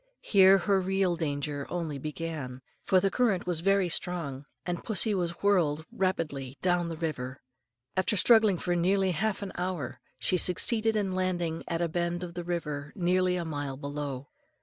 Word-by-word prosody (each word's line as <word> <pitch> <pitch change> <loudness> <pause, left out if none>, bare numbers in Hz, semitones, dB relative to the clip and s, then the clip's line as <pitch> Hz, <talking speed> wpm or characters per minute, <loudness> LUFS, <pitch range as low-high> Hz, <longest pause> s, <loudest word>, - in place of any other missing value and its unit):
Here 195 -1 +6
her 195 +1 +1
real 190 -1 +1
danger 145 -3 -3
only 160 -5 -3
began, 150 -4 -5 0.2
for 190 - +3
the 195 +1 +1
current 225 -7 +1
was 175 -3 +3
very 195 +1 +2
strong, 165 -6 -1 0.2
and 175 0 -3
pussy 220 0 +2
was 175 -2 -3
whirled 160 -7 +2
rapidly 150 -8 -2
down 175 -1 +2
the 165 -1 -5
river. 135 -5 -4 0.5
After 190 +3 +1
struggling 220 -3 +6
for 175 +1 -1
nearly 190 +2 +2
half 205 +5 -1
an 195 - -5
hour, 180 -7 -4 0.2
she 185 - +1
succeeded 220 +5 +3
in 200 -3 0
landing 175 -3 -1
at 170 0 -1
a - - +1
bend 175 +1 -2
of 175 -1 -6
the 175 0 -5
river 150 -4 -4
nearly 185 0 +2
a 175 -2 -2
mile 145 -4 -4
below. 140 -1 -5
175 Hz, 170 wpm, -29 LUFS, 150-190 Hz, 0.5 s, Here